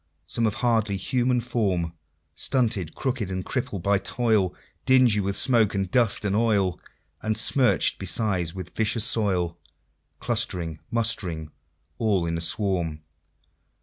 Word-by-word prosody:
Some, 115 +7 0
of 105 - -2
hardly 110 -5 +1
human 125 +5 0
form, 100 -9 -1 0.4
Stunted, 110 - 0
crooked, 125 -7 -2
and 95 -1 -4
crippled 105 -8 -3
by 100 0 +2
toil; 110 -3 +1 0.3
Dingy 130 -5 +4
with 100 0 -1
smoke 115 -6 +2
and 95 -2 -2
dust 115 -4 +3
and 100 0 0
oil, 105 -5 +1 0.4
And 110 0 -1
smirch'd 125 +3 +2
besides 95 -3 0
with 90 -2 -8
vicious 110 +1 +2
soil, 95 -7 +1 0.6
Clustering, 85 -3 -1
mustering, 90 -9 -1 0.5
all 100 -6 +1
in 85 0 -2
a 85 - -3
swarm. 85 -4 -1
100 Hz, 130 wpm, -25 LUFS, 90-115 Hz, 0.6 s, Dingy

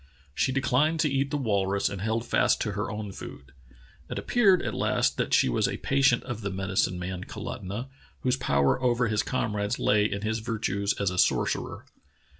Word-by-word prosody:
She 130 - +1
declined 140 +4 +1
to 150 -4 +1
eat 135 0 0
the 145 - -1
walrus 100 -6 0
and 100 -2 -5
held 110 +2 -1
fast - - +2
to 105 - -1
her 100 -1 -3
own 105 -2 -5
food. 70 -8 -10 0.6
It - - -4
ap - - -5
peared 200 -7 +4
at 110 - -2
last - - +1
that - - -1
she - - +4
was - - +1
a - - -3
patient 135 -3 +2
of 115 -2 -5
the 100 - -2
medicine 95 -1 -1
man, 90 +1 -5
Kalutunah, 100 +7 -6 0.3
whose 125 0 +2
power 70 - +1
over 120 -2 +2
his 110 0 +1
comrades 105 -3 -1
lay 105 0 +3
in 100 0 -3
his 110 +1 -1
virtues 105 -3 -1
as 100 -2 +1
a 90 - -2
sorcerer. - - 0
110 Hz, 195 wpm, -27 LUFS, 100-125 Hz, 0.6 s, peared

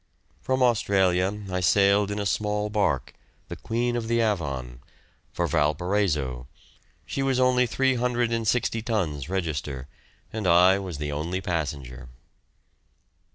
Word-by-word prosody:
From 130 +9 0
Australia 100 -4 +2
I 90 - 0
sailed 100 +2 +3
in 105 - -3
a 100 - -2
small 105 +1 -1
barque, 100 - 0 0.4
the - - -5
"Queen 120 +1 -2
of 115 -2 -3
the 115 0 +1
Avon," 70 - -2 0.5
for - - -1
Valparaiso; 75 -6 0 0.6
she 135 - -3
was 135 -1 +1
only 125 -1 +3
360 120 -2 0
tons 85 - -2
register, 75 -8 -3 0.5
and 110 -3 -2
I 90 +3 +5
was 90 -6 -6
the 75 0 -3
only 80 +6 -2
passenger. 70 -8 -4
95 Hz, 120 wpm, -25 LUFS, 75-115 Hz, 0.6 s, I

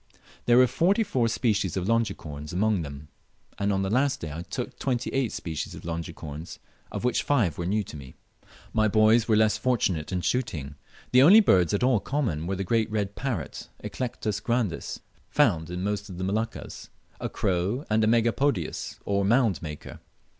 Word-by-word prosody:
There 120 0 +6
were 130 - +8
forty 180 - +2
four 125 - +1
species 105 -6 0
of 95 0 -2
Longicorns 90 -10 -2
among 100 +1 +1
them, 70 -1 -8 0.5
and 100 0 +1
on 95 0 0
the 95 - -1
last 135 +4 +2
day 80 - -5
I 80 +3 -5
took 85 - -6
twenty 125 -3 -1
eight 135 -4 +1
species 80 -4 -5
of - - -11
Longicorns, 80 -2 -6 0.3
of - - -4
which 125 - +2
five 110 - +1
were 85 - -2
new 105 +3 +1
to 85 - -10
me. 65 -3 -10 0.6
My 110 -1 +3
boys 110 +2 +4
were 110 - +4
less 110 0 +3
fortunate 100 -10 0
in 90 -1 -1
shooting. 85 - -2 0.4
The 125 - +6
only 185 +11 +9
birds 90 - +4
at 100 - 0
all 125 -3 +4
common 100 - -2
were 95 - -1
the 95 - -2
great 110 +3 +1
red 105 -2 -2
parrot 120 - -4
(Eclectus 110 -5 -3
grandis), 115 -6 -2 0.3
found 80 -1 +2
in 90 +1 -4
most 105 +1 -2
of 90 - -8
the 90 - -4
Moluccas, 110 +4 -3 0.3
a - - -3
crow, 95 - -1
and 110 +1 +2
a - - +3
Megapodius, 115 - +1
or 100 0 +1
mound 110 - +2
maker. 75 -2 -8
105 Hz, 180 wpm, -26 LUFS, 85-120 Hz, 0.6 s, only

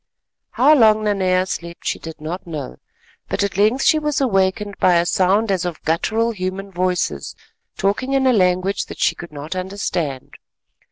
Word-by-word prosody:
How 305 - +5
long 215 -6 +5
Nanea 185 -3 +1
slept 170 -2 -6
she - - -1
did 160 -1 -9
not 170 +5 -6
know, 150 - -6 0.5
but - - 0
at 200 - -2
length 215 +6 +2
she 310 - +4
was 300 -2 -1
awakened 200 -4 0
by 180 -1 +4
a 170 0 +3
sound 195 +4 +2
as 185 -3 0
of 175 -3 -4
guttural 220 +8 0
human 195 -1 -5
voices 180 - -2 0.4
talking 215 +7 0
in 270 -1 +2
a 260 - +4
language 185 -1 +1
that - - -9
she - - +2
could 170 - -10
not 150 +4 -6
understand. 180 -7 -4
190 Hz, 170 wpm, -20 LUFS, 175-215 Hz, 0.5 s, How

